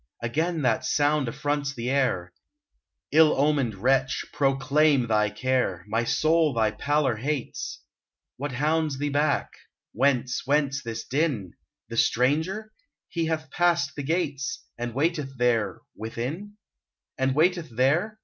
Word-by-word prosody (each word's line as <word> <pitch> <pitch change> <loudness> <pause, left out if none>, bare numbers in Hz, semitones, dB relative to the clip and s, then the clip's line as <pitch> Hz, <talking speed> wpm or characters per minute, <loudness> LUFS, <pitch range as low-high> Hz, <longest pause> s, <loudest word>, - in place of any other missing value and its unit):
Again 160 +6 -1
that 120 -3 +2
sound 145 -2 +2
affronts 145 +2 -2
the 120 +1 -2
air! 95 -11 0 0.8
Ill 155 +1 +5
omened 140 -6 +2
wretch, 130 +6 +1
proclaim 140 0 +3
thy 105 -2 +2
care 125 -7 -1
— - - -25
My 115 +3 0
soul 155 0 +2
thy 110 -2 +2
pallor 140 0 0
hates! 140 +2 -4 0.5
What 140 +1 -4
hounds 150 +1 0
thee 145 +1 -1
back? 145 +1 +1 0.4
Whence, 125 -1 +1
whence 140 -1 +1
this 115 -2 -5
din? 130 - -1 0.4
The 115 - -6
stranger? 160 - +1 0.4
He 165 -1 -1
hath 160 -2 -3
passed 170 -5 +2
the 145 - -4
gates 155 0 -2
— - - -51
And 120 -1 -4
waiteth 150 -2 0
there 115 -6 +1
— - - -60
within? 115 +5 -4
io6 175 - -8
UNBIDDEN 205 0 -21 0.6
And 130 0 +1
waiteth 170 0 +2
there 155 - +1
140 Hz, 145 wpm, -26 LUFS, 120-155 Hz, 0.8 s, Ill